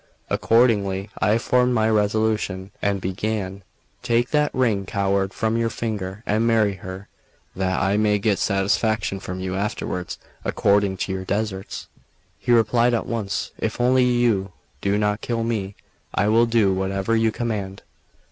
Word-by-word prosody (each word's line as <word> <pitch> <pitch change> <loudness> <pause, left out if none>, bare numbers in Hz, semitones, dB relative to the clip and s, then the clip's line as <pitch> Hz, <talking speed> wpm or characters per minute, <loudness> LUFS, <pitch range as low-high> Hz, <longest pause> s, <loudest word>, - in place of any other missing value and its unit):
Accordingly, 105 -4 +2
I 110 +1 +3
formed 125 +1 +2
my 110 -1 +3
resolution, 105 -2 0
and 100 -1 +1
began: 95 +1 -3 0.4
"Take 120 -1 +1
that 150 -1 +3
ring, 110 -7 0
coward, 100 -1 0
from 110 +2 -1
your 115 0 +1
finger, 105 -3 -4
and 110 +3 +1
marry 110 -3 +3
her, 95 +2 -8 0.5
that 95 0 0
I 100 +2 +2
may 105 -1 +3
get 100 -1 +1
satisfaction 100 +1 +1
from 90 -1 -6
you 95 0 -3
afterwards 95 -2 -3 0.3
according 100 -1 +2
to - - -5
your 95 0 -3
deserts." 100 0 -3 0.5
He 120 - -1
replied 120 +1 +4
at 115 - -2
once: 105 -4 -3
"If 110 - -2
only 125 +1 +4
you 115 -6 +1 0.3
do 100 +1 +1
not 105 +1 0
kill 115 -1 -1
me, 105 -4 -2 0.4
I 100 +2 +2
will 115 +2 +4
do 110 -4 +3
whatever 95 +3 0
you 110 0 +2
command." 105 -5 -4
105 Hz, 150 wpm, -23 LUFS, 95-115 Hz, 0.5 s, replied